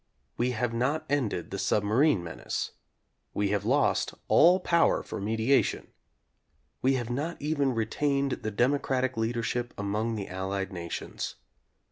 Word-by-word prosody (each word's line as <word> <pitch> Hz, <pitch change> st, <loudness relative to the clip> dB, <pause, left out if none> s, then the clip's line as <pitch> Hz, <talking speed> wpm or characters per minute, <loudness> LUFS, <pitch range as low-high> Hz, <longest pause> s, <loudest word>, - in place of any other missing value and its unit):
We 120 Hz, +1 st, +1 dB
have 120 Hz, 0 st, 0 dB
not 140 Hz, +7 st, 0 dB
ended 120 Hz, -, -1 dB
the 100 Hz, -, -3 dB
submarine 105 Hz, -, +2 dB
menace. 85 Hz, -, -4 dB, 0.6 s
We 100 Hz, -1 st, +1 dB
have 100 Hz, -2 st, 0 dB
lost -, -, +2 dB
all 180 Hz, +3 st, +6 dB
power 170 Hz, -2 st, +3 dB
for -, -, -6 dB
mediation. 110 Hz, +6 st, +1 dB, 0.9 s
We 135 Hz, +1 st, +3 dB
have 120 Hz, -2 st, -3 dB
not 150 Hz, +7 st, -3 dB
even 145 Hz, -3 st, 0 dB
retained 140 Hz, +5 st, 0 dB
the 110 Hz, -, -2 dB
democratic 130 Hz, +2 st, +1 dB
leadership 120 Hz, +1 st, -2 dB
among 105 Hz, +3 st, -1 dB
the 100 Hz, -3 st, -4 dB
Allied 95 Hz, +1 st, -3 dB
nations. 85 Hz, -2 st, -5 dB
120 Hz, 130 wpm, -28 LUFS, 105-140 Hz, 0.9 s, all